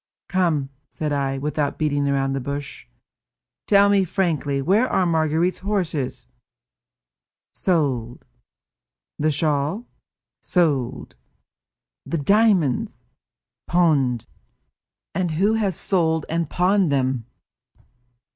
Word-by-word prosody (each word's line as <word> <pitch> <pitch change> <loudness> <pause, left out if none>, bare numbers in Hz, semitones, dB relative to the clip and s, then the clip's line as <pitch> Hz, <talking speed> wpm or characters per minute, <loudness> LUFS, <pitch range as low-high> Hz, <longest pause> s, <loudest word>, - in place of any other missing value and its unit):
"Come," 165 -7 0 0.2
said 150 -2 -3
I, 135 -1 -1
without 145 +1 -2
beating 145 -2 0
about 135 -1 0
the 135 - -2
bush, 140 +2 -6 0.8
"tell 200 -1 +5
me 200 -1 +3
frankly, 160 -6 -1
where 200 - +2
are 185 - +2
Marguerite's 160 +1 +1
horses?" 165 - -2 1.3
"Sold." 135 -10 -1 0.9
"The 155 +1 +2
shawl?" 150 - 0 0.6
"Sold." 145 -9 0 0.9
"The 170 - -1
diamonds?" 200 - +2 0.7
"Pawned." 145 -9 +2 0.9
"And 180 0 -1
who 195 +7 +2
has 205 -5 0
sold 160 -5 0
and 165 -1 -1
pawned 185 -2 +2
them?" 130 -4 0
155 Hz, 95 wpm, -22 LUFS, 140-185 Hz, 1.3 s, tell